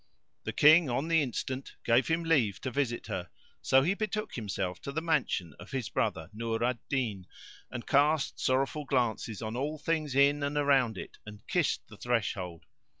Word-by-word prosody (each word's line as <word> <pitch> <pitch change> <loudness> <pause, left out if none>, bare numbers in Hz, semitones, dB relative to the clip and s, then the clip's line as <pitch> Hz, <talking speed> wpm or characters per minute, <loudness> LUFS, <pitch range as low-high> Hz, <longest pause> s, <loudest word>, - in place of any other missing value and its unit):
The - - -2
King 155 0 +6
on 135 +6 -1
the 165 -1 +4
instant 130 0 -4
gave 120 +2 +3
him 165 +1 +1
leave 135 - +2
to 130 - -3
visit 125 -2 -1
her; - - -4 0.3
so 135 0 +4
he 175 +7 +2
betook 215 0 -3
himself 95 -5 -3
to 140 - -5
the 150 - -1
mansion 150 - 0
of - - -11
his 130 -4 -3
brother, - - -1
Nur 115 +1 -2
al 120 -1 0
Din, 110 -9 -2 0.4
and 120 - -6
cast 145 +1 +2
sorrowful 135 +3 0
glances 120 -4 -1
on 110 +1 -4
all 145 +5 -2
things 155 -2 -1
in 140 +1 +4
and 140 +1 -1
around 135 -7 +3
it - - -9
and 105 -1 -12
kissed 175 -4 0
the 110 - -13
threshold. 95 -8 -2
130 Hz, 180 wpm, -30 LUFS, 115-150 Hz, 0.4 s, King